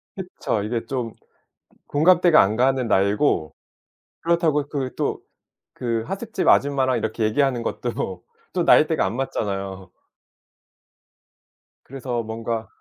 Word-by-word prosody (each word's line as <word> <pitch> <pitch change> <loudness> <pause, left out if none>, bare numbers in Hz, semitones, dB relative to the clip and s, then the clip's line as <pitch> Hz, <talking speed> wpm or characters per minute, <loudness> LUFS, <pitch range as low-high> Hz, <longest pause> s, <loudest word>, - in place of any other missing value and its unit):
그쵸. 180 - -3
이게 115 +2 -3
좀 125 -4 -3 0.8
공감대가 170 +2 +5
안 105 +3 0
가는 130 0 +2
나이고 100 - +1 0.7
그렇다고 165 -4 +1
그 135 -3 -3
또 - - -1 0.5
그 115 -2 -2
하숙집 195 0 -2
아줌마랑 135 -3 +3
이렇게 110 +1 -3
얘기하는 120 +2 +1
것도 95 -8 -4 0.3
또 - - 0
나이대가 - - +4
안 - - -3
맞잖아요. 95 -7 -4 1.9
그래서 125 -3 -4
뭔가 115 0 -4
125 Hz, 250 characters per minute, -23 LUFS, 110-145 Hz, 1.9 s, 공감대가